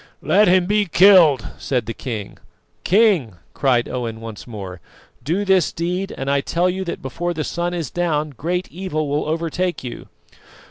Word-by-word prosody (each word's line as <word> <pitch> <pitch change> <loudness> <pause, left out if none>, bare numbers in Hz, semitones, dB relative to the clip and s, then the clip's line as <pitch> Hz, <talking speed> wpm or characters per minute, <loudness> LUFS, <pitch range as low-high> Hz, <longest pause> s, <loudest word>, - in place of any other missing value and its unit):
"Let 210 +1 +4
him 180 0 +4
be 205 +2 +2
killed!" 170 - +6
said 125 -5 -1
the 115 - -4
king. 110 -6 -6 0.4
"King!" 185 - +3 0.2
cried 125 -3 +1
Owen 115 -3 -4
once 115 -1 -9
more, 95 -6 -8 0.4
"do 180 +8 -1
this 190 -3 +3
deed, 180 +4 -3
and 135 - -4
I 140 0 +2
tell 175 +5 +1
you 190 +1 -3
that 170 - -5
before 175 +6 -3
the 155 - -2
sun 175 +2 -2
is 165 -7 -4
down 155 -4 -1
great 175 +8 -3
evil 170 -4 -3
will 145 +1 -1
overtake 165 +2 -2
you." 125 - -7
165 Hz, 170 wpm, -20 LUFS, 130-180 Hz, 0.4 s, killed